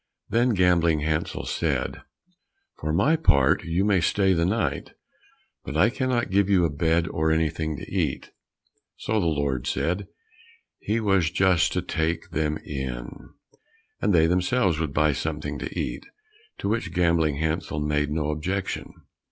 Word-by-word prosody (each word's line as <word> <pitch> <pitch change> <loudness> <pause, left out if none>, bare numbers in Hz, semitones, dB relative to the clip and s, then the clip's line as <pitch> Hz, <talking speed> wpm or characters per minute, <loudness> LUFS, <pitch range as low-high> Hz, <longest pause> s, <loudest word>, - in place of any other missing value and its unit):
Then 120 0 +2
Gambling 85 -4 +3
Hansel 75 +1 -2
said, - - -2 0.8
"For 75 - -3
my 140 - +3
part, 70 - +3
you 85 +4 0
may 100 -4 +3
stay 95 +2 +2
the 85 -1 +1
night, 110 +3 -2 0.7
but 70 +4 -4
I 105 +8 +4
cannot 130 -3 -1
give 100 0 +2
you 95 -4 +4
a 80 - 0
bed 80 +3 +1
or 80 -1 0
anything 80 -1 -1
to - - -8
eat." - - -2 0.7
So 110 0 -1
the 85 - +1
Lord 70 -5 -1
said 90 +4 -1 0.7
he 110 +2 -1
was 95 -6 +2
just 90 -1 +2
to 90 - -1
take 80 -1 -2
them 75 0 -1
in, 65 -4 -5 0.9
and 105 - +2
they 80 -3 +5
themselves 90 +1 +1
would 80 -3 -2
buy 75 +1 +3
something 75 -1 -4
to - - -5
eat, - - -4 0.5
to - - -4
which 115 +3 -1
Gambling 85 -4 +2
Hansel 80 +1 -2
made 75 0 0
no 75 0 -1
objection. 90 +6 -3
80 Hz, 150 wpm, -25 LUFS, 75-95 Hz, 0.9 s, they